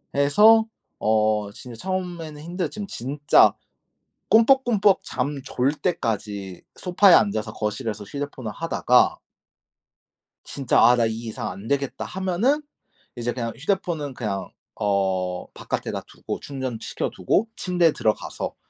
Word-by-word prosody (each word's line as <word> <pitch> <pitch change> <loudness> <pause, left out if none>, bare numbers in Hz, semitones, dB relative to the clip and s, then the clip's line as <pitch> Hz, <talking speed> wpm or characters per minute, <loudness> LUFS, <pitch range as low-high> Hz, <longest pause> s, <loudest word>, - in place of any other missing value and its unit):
해서 210 +11 +6 0.3
어 110 -1 +1
진짜 120 +3 -11
처음에는 175 -2 -4
힘들었지만 180 +4 -4
진짜 145 +3 +3 0.8
꿈뻑꿈뻑 225 -4 +4
잠 140 +2 -3
졸 130 +1 0
때까지 105 - -3
소파에 185 +1 +4
앉아서 110 0 +1
거실에서 105 0 -3
휴대폰을 130 -1 -5
하다가 125 -4 +2 1.3
진짜 135 -4 0
'아 120 - +7
나 120 -1 +2
이 110 - -1
이상 110 - -4
안 100 +4 -8
되겠다.' 140 0 -1
하면은 190 +10 0 0.5
이제 120 0 -2
그냥 115 -2 -3
휴대폰은 165 -3 -2
그냥 105 -6 -4 0.3
어 95 -3 -1
바깥에다 - - -4
두고 - - -6
충전시켜 130 -5 -4
두고 225 - +1
침대에 175 -3 +2
들어가서 110 -6 -2
135 Hz, 275 characters per minute, -24 LUFS, 110-180 Hz, 1.3 s, 아